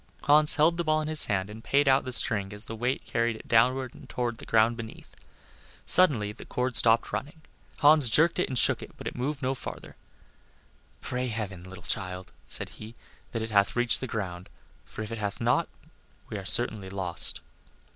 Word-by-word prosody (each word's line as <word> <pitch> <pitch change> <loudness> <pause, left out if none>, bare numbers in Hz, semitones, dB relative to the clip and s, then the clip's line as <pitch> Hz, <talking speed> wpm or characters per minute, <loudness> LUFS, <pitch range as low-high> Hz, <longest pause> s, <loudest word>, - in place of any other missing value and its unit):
Hans 150 +1 +5
held 160 +3 +3
the 170 - -1
ball 155 -1 +1
in 155 - -4
his 155 -1 +3
hand 95 -2 -1
and 110 +2 -11
paid 140 0 +1
out 135 0 +3
the 130 - -5
string 100 -5 0
as 105 +1 -7
the 115 - -7
weight 125 +4 -2
carried 115 -1 -1
it - - -13
downward 125 +2 +2 0.2
toward 120 -2 -3
the - - -11
ground 115 +1 +3
beneath. 115 -1 -10 0.7
Suddenly 130 - +4
the - - -12
cord 125 0 -3
stopped 115 0 +3
running. 155 +3 -6 0.3
Hans 150 -3 +5
jerked 165 +9 +3
it 180 - 0
and 130 - -3
shook - - +3
it, - - -12
but - - -11
it - - -5
moved 135 +3 -4
no 130 +1 0
farther. 130 - -9 1.1
"Pray 125 0 -3
heaven, 105 -6 -5
little 95 0 -12
child," 90 -1 -4 0.2
said - - +1
he, 110 +2 -12 0.4
"that 115 -2 -3
it 110 - -6
hath 100 0 +2
reached 120 -1 +3
the 130 - -4
ground, 90 -6 -6 0.4
for 110 - -8
if 105 - -8
it 115 - -5
hath 100 -1 -4
not - - +1 0.6
we 105 - -4
are 95 - -10
certainly 105 -2 +4
lost." 90 -3 +1
115 Hz, 195 wpm, -27 LUFS, 105-135 Hz, 1.1 s, Hans